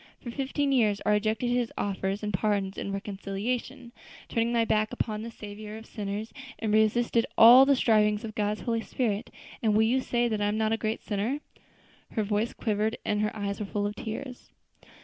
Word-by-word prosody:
For 240 Hz, -, -7 dB
fifteen 275 Hz, +2 st, -1 dB
years 215 Hz, -6 st, +3 dB
I -, -, +3 dB
rejected 215 Hz, +3 st, +1 dB
His 245 Hz, -1 st, 0 dB
offers 195 Hz, +1 st, -2 dB
of 210 Hz, -1 st, -2 dB
pardon 195 Hz, 0 st, 0 dB
and 200 Hz, -, -4 dB
reconciliation, 210 Hz, +6 st, -4 dB, 0.4 s
turned 230 Hz, 0 st, 0 dB
my 230 Hz, -1 st, +2 dB
back 215 Hz, 0 st, +1 dB
upon 215 Hz, -3 st, -3 dB
the 230 Hz, -, -6 dB
Saviour 210 Hz, -1 st, -8 dB
of 220 Hz, -, -11 dB
sinners, 210 Hz, +1 st, -5 dB, 0.2 s
and 215 Hz, -2 st, -1 dB
resisted 230 Hz, +2 st, +3 dB
all 250 Hz, +4 st, +9 dB
the 280 Hz, -, +5 dB
strivings 215 Hz, -3 st, +3 dB
of 215 Hz, -, -6 dB
God's 210 Hz, -1 st, -1 dB
Holy 230 Hz, -2 st, -1 dB
Spirit, 225 Hz, -2 st, -2 dB, 0.3 s
and 215 Hz, -2 st, +2 dB
will 220 Hz, -, +5 dB
you 250 Hz, +4 st, +2 dB
say 240 Hz, -1 st, 0 dB
that 215 Hz, -3 st, -1 dB
I 205 Hz, -, +2 dB
am 210 Hz, +1 st, 0 dB
not 220 Hz, 0 st, +1 dB
a -, -, +3 dB
great 220 Hz, 0 st, -3 dB
sinner?" 215 Hz, +7 st, -1 dB, 0.7 s
Her 220 Hz, -, 0 dB
voice 210 Hz, +3 st, 0 dB
quivered, 215 Hz, 0 st, -1 dB
and 210 Hz, 0 st, 0 dB
her 210 Hz, +1 st, -1 dB
eyes 200 Hz, -1 st, -3 dB
were 210 Hz, -, -2 dB
full 205 Hz, +1 st, -2 dB
of 205 Hz, 0 st, -3 dB
tears. 245 Hz, +3 st, -7 dB
215 Hz, 195 wpm, -28 LUFS, 210-235 Hz, 0.7 s, all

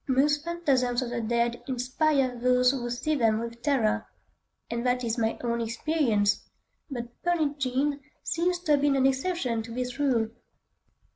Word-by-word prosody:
Most 290 Hz, +3 st, +2 dB
phantasms 270 Hz, -8 st, +1 dB
of 240 Hz, -, -5 dB
the 240 Hz, -1 st, -2 dB
dead 235 Hz, +1 st, 0 dB
inspire 260 Hz, +1 st, +1 dB
those 250 Hz, +1 st, +3 dB
who 245 Hz, -3 st, -3 dB
see 245 Hz, +6 st, -1 dB
them 225 Hz, -6 st, +3 dB
with 235 Hz, 0 st, -7 dB
horror,—and 235 Hz, -2 st, -3 dB
that 250 Hz, 0 st, +1 dB
is 230 Hz, 0 st, -1 dB
my 225 Hz, 0 st, 0 dB
own 235 Hz, -1 st, 0 dB
experience,—but 235 Hz, -1 st, -2 dB
"Pearlin' 315 Hz, -5 st, 0 dB
Jean" 275 Hz, +2 st, 0 dB, 0.2 s
seems 350 Hz, +2 st, 0 dB
to 320 Hz, -, -1 dB
have 290 Hz, -1 st, +4 dB
been 285 Hz, -1 st, +3 dB
an 265 Hz, -1 st, +3 dB
exception 270 Hz, -3 st, 0 dB
to 230 Hz, +1 st, -9 dB
this 250 Hz, +2 st, -4 dB
rule. 245 Hz, -6 st, +2 dB
250 Hz, 150 wpm, -27 LUFS, 235-290 Hz, 0.2 s, have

